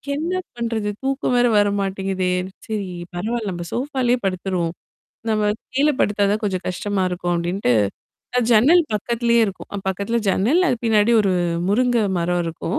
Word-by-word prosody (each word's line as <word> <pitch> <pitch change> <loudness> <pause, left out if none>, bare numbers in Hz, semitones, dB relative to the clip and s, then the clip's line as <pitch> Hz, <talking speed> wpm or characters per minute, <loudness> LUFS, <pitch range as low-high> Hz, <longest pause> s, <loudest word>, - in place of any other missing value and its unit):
என்ன 330 +5 -2 0.2
பண்றது? 225 -3 -2
தூக்கம் 270 -1 0
வேற 245 0 +4
வர 205 0 +4
மாட்டேங்குதே! 190 -1 -1 0.4
சரி 210 -3 -3 0.3
பரவால்ல. 220 +4 -2
நம்ம 175 -1 -5
சோஃபாலயே 255 -1 0
படுத்துருவோம். 185 -2 -1 0.6
நம்ம 210 -1 +2 0.2
கீழ 285 +3 +3
படுத்தா 205 0 +2
தான் 215 - 0
கொஞ்சம் 190 -3 -1
கஷ்டமா 190 +1 -1
இருக்கும் 175 0 -2
அப்டின்ட்டு. 175 -4 0 0.7
அ - - +4
ஜன்னல் 285 +11 +6
பக்கத்திலேயே 235 +2 +1
இருக்கும். 195 - -7 0.2
பக்கத்தில 200 +5 -1
ஜன்னல் 235 - +3
அது 250 - +1
பின்னாடி 220 +1 +3
ஒரு 195 -2 +1 0.4
முருங்க 245 +3 +2 0.2
மரம் 175 +1 0
இருக்கும். 165 +1 -3
210 Hz, 145 wpm, -21 LUFS, 185-240 Hz, 0.7 s, ஜன்னல்